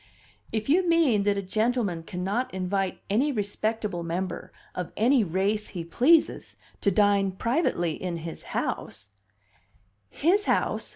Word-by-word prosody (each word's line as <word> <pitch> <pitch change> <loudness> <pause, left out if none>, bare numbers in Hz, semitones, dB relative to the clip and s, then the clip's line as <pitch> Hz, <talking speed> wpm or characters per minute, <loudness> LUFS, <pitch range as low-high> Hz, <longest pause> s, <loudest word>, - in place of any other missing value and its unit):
"If 220 -1 -2
you 350 +5 +3
mean 280 -12 +3
that 205 -1 +2
a 200 - -2
gentleman 215 -3 0
cannot 190 +9 -2
invite 190 0 -2
any 255 +9 +2
respectable 210 -3 -2
member 170 +2 -4 0.2
of 180 -2 -4
any 240 +2 +4
race 200 +4 0
he 175 -4 -6
pleases 285 - +2 0.2
to - - +2
dine 200 -1 +3
privately 190 - 0
in 180 -2 -3
his 165 0 -7 0.2
house 100 0 -3 0.5
" 100 0 -39 0.2
"His 400 +5 +4
house!" - - 0
200 Hz, 135 wpm, -26 LUFS, 175-235 Hz, 0.5 s, any